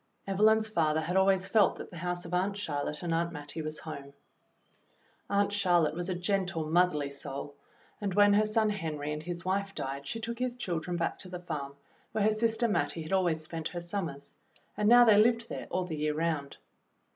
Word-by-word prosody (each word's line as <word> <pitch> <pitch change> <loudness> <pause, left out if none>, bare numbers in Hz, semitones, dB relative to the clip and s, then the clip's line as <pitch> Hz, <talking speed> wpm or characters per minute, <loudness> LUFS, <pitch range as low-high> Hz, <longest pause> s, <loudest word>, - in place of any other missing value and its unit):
Evelyn's 215 +3 +3
father 160 -6 +1
had 175 +3 -3
always 190 0 +4
felt 200 0 +4
that - - -8
the 175 - -9
house 175 +1 -3
of 170 - -7
Aunt 195 +3 0
Charlotte 150 -4 -3
and 170 -1 -1
Aunt 170 +1 0
Mattie 150 0 -6
was 155 0 -4
home. 140 -3 -8 1.2
Aunt 200 0 +2
Charlotte 175 -6 +3
was 175 +2 -4
a 185 - -1
gentle, 180 -3 -1
motherly 155 -4 +2
soul, 140 0 -6 0.5
and 195 -3 -2
when 205 0 +6
her 210 +1 +4
son 215 0 +2
Henry 150 -7 -3
and 150 - -4
his 175 +1 -6
wife 195 +1 -1
died 140 +1 -4
she 225 - -3
took 235 +1 -5
his 250 -1 -1
children 175 -6 -3
back 170 - -1
to 185 - -11
the 180 - -5
farm 145 -5 -5 0.4
where 215 - +1
her 215 - +4
sister 225 +2 +1
Mattie 170 -6 -1
had 155 - -5
always 175 -4 +1
spent 160 0 -4
her 175 - -5
summers, 170 -5 -5 0.4
and 210 0 +2
now 240 0 +8
they 210 -2 +7
lived 230 +1 +2
there - - -5
all 185 - 0
the 160 -3 -5
year 150 0 0
round. 155 -3 -2
175 Hz, 205 wpm, -30 LUFS, 155-205 Hz, 1.2 s, now